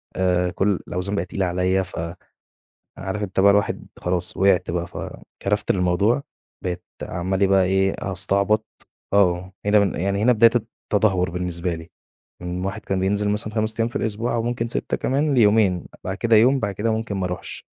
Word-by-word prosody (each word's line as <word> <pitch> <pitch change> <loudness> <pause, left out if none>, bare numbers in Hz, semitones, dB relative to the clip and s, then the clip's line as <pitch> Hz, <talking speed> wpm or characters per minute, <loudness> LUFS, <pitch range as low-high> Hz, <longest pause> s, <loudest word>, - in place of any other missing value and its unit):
آآ، 90 -1 +1
كل 95 +1 +1
الأوزان 95 +3 -2
بقت 90 -2 -2
تقيلة 95 -2 -1
عليَّ، 90 +2 +1
ف 90 - -11 1.0
عارف 95 +3 -4
أنت 95 -1 -1
بقى 100 +1 +7
الواحد 100 0 0
خلاص 90 0 -2
وقعت 95 -3 +3
بقى، 85 0 -2
فكرفت 105 +3 -3
للموضوع، 95 +8 +2 0.4
بقيت 90 -1 -3 0.2
عمّال 95 +2 -2
إيه 100 - +4
بقى 95 -1 +4
إيه 95 +1 +2
أستعبط 100 +3 +1 0.5
آه 90 -2 +2
هنا 105 +1 +5
بن 100 -3 +1
يعني 100 +2 0
هنا 125 - +5
بداية 115 0 +6
الت 115 -1 -1 0.3
التدهور 95 -4 +2
بالنسبة 90 -1 -2
لي، 80 0 -10 0.5
من 90 +1 -4
واحد 110 +3 -4
كان 95 -2 -1
بينزل 100 +2 +1
مثلًا 105 +1 -2
5 110 +1 0
أيام 115 - +2
في 120 - -8
الأسبوع 115 +2 -1
أو 115 - 0
ممكن 120 0 -2
6 - - -1
كمان، 140 +2 +1
ليومين، 105 -6 +3 0.2
بعد 95 +1 -3
كده 115 -1 +3
يوم، 130 +5 +5
بعد 100 -2 -2
كده 110 +3 0
ممكن 110 -2 -2
ما 95 - -1
أرُوحش. 90 0 -5
100 Hz, 180 wpm, -22 LUFS, 90-110 Hz, 1.0 s, بقى